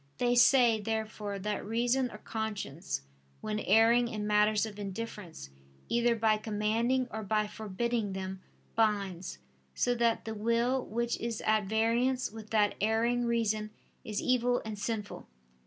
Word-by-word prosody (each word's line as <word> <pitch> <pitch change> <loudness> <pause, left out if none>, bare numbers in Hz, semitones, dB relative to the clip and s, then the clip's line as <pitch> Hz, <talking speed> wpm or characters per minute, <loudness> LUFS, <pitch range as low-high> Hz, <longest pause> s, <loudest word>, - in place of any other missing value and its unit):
They 245 0 +2
say, 240 -2 +5
therefore, 215 -2 -3
that 210 +2 -3
reason 240 +4 +1
or 210 - -9
conscience 205 - -4 0.4
when 215 0 -3
erring 230 +3 +4
in 215 -3 -4
matters 210 +1 +3
of 210 -2 -8
indifference, 195 - -6 0.4
either 235 0 +2
by 220 -1 +3
commanding 225 +4 0
or 220 - -4
by 215 +1 +1
forbidding 215 +1 -2
them, 190 0 -5 0.3
binds: 200 -5 0 0.4
so 245 - +2
that 235 -1 +1
the 220 - -4
will 235 +4 +1
which 235 +2 -2
is 230 -2 -3
at 215 -1 +2
variance 230 +5 +1
with 220 -1 -10
that 210 -2 +3
erring 230 +3 +2
reason 220 -2 0 0.3
is 210 -1 -3
evil 245 -1 +2
and 215 -2 -5
sinful. 210 0 -4
220 Hz, 140 wpm, -31 LUFS, 210-235 Hz, 0.4 s, say